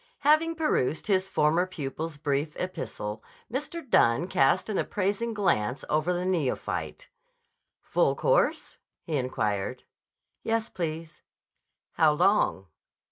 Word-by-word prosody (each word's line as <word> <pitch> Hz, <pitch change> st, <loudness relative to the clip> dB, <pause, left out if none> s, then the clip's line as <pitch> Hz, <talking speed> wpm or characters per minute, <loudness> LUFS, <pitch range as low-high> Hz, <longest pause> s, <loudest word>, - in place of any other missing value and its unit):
Having 310 Hz, +3 st, +3 dB
perused 160 Hz, -, 0 dB
his 190 Hz, -2 st, +1 dB
former 165 Hz, +4 st, +2 dB
pupil's 155 Hz, -1 st, -5 dB
brief 145 Hz, +1 st, -2 dB
epistle, 110 Hz, -12 st, -5 dB, 0.3 s
Mr. 300 Hz, +3 st, -4 dB
Dunne 120 Hz, -, +4 dB
cast 135 Hz, -7 st, +2 dB
an 215 Hz, -, -1 dB
appraising 205 Hz, +4 st, -1 dB
glance 170 Hz, -, 0 dB
over 155 Hz, +3 st, +2 dB
the 180 Hz, 0 st, -1 dB
neophyte. 185 Hz, -, -2 dB, 0.8 s
"Full -, -, +2 dB
course?" -, -, +1 dB, 0.2 s
he 160 Hz, -, -3 dB
inquired. 105 Hz, -6 st, -2 dB, 0.6 s
"Yes, 225 Hz, 0 st, -1 dB
please." 160 Hz, -2 st, -5 dB, 0.8 s
"How 155 Hz, -2 st, +6 dB
long?" 180 Hz, -, +2 dB
170 Hz, 110 wpm, -27 LUFS, 145-210 Hz, 0.8 s, How